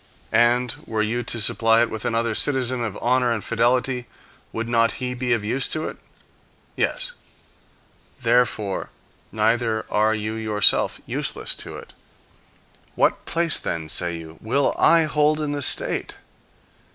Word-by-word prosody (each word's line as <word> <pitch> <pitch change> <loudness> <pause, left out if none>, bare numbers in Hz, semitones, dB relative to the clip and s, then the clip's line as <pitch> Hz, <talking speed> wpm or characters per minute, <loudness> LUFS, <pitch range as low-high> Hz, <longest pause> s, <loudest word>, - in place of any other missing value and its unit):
And 120 +2 +3
were 110 -1 0
you 115 +3 -1
to 120 - -3
supply 115 +2 +3
it 120 - -3
with 110 0 -5
another 115 0 0
citizen 130 0 0
of 110 -4 -4
honor 125 0 +2
and 115 -3 -2
fidelity, 125 +2 0 0.4
would 115 0 -4
not 115 -1 +2
he 125 -1 -4
be 125 0 -3
of 115 -3 +1
use 125 +6 0
to 155 0 -2
it? - - -7 0.8
Yes. - - -1 1.1
Therefore 115 -5 +1 0.4
neither 110 0 0
are 110 +1 +2
you 110 0 -3
yourself 110 -2 +3
useless - - -1
to - - -8
it. - - -13 1.0
"What - - +1
place, 165 -1 +3
then, 80 -2 -4
say 85 0 0
you, 80 -1 -11
will 135 +6 +1
I 165 -1 +6
hold 150 0 +1
in 150 -1 -2
the 145 0 -3
state?" - - 0
115 Hz, 145 wpm, -23 LUFS, 110-130 Hz, 1.1 s, I